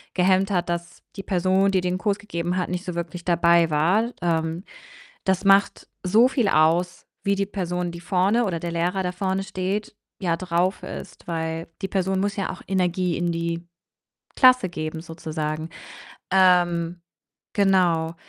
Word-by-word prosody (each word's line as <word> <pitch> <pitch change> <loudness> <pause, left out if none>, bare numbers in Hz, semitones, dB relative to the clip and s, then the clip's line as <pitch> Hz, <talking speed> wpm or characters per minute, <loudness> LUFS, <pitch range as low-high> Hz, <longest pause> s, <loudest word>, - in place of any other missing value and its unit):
gehemmt 185 +1 +3
hat, 180 -2 0
dass 170 0 -5
die 195 - -6
Person, 190 +1 +2
die 190 -1 +2
den 180 0 -1
Kurs 200 0 0
gegeben 180 -3 -3
hat, 180 - -1
nicht 180 0 -3
so 180 -2 -4
wirklich 170 0 -5
dabei 170 -1 +4
war. 180 +10 +2
Ähm, 165 0 -1 0.6
das 190 -1 +1
macht 195 0 +3 0.2
so 215 +7 +5
viel 250 -4 0
aus, 170 +2 +2 0.2
wie 200 0 +2
die 200 0 0
Person, 180 -3 -3
die 170 0 -9
vorne 195 +6 +2
oder 175 -5 -2
der 170 +1 -4
Lehrer, 175 +3 0
der 180 0 -2
vorne 190 +1 -1
steht, 195 +3 -3 0.3
ja 170 -3 0
drauf 180 +1 -1
ist, - - -9
weil 165 -1 -3
die 195 - -1
Person 190 0 0
muss 200 +1 -1
ja 195 - -2
auch - - -10
Energie 180 -2 0
in 175 0 0
die 170 0 -3 0.7
Klasse 255 -6 +6
geben 155 -1 -5
sozusagen. 160 -1 -4 0.6
Ähm, 175 -2 +3 0.5
genau. 175 -5 +2
180 Hz, 160 wpm, -24 LUFS, 170-190 Hz, 0.7 s, Klasse